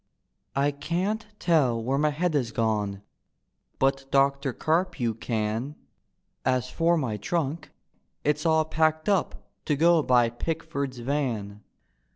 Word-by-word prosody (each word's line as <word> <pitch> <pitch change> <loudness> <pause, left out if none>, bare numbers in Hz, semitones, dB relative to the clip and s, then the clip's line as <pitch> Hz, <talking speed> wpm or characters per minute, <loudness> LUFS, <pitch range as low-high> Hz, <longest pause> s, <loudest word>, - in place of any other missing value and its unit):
" - - -50
I 140 +1 +2
can't 185 +9 -2
tell 145 - +2
where 125 +4 -1
ray 150 +1 +3
head 160 +3 -1
is 125 -6 0
gone, 105 -3 -1 0.7
But 135 0 +1
Doctor 140 0 +2
Carpue 155 -6 0
can; 115 +5 -2 0.7
As 130 0 0
for 170 +3 +2
my 120 -8 -1
trunk, 155 - -2 0.5
it's 150 +1 +1
all 160 -1 +3
packed 155 0 +1
up 200 -4 0 0.2
To 150 - +1
go 165 +2 +5
by 120 -4 +3
Pickford's 140 0 -3
van. 120 -6 -2
140 Hz, 130 wpm, -26 LUFS, 120-160 Hz, 0.7 s, go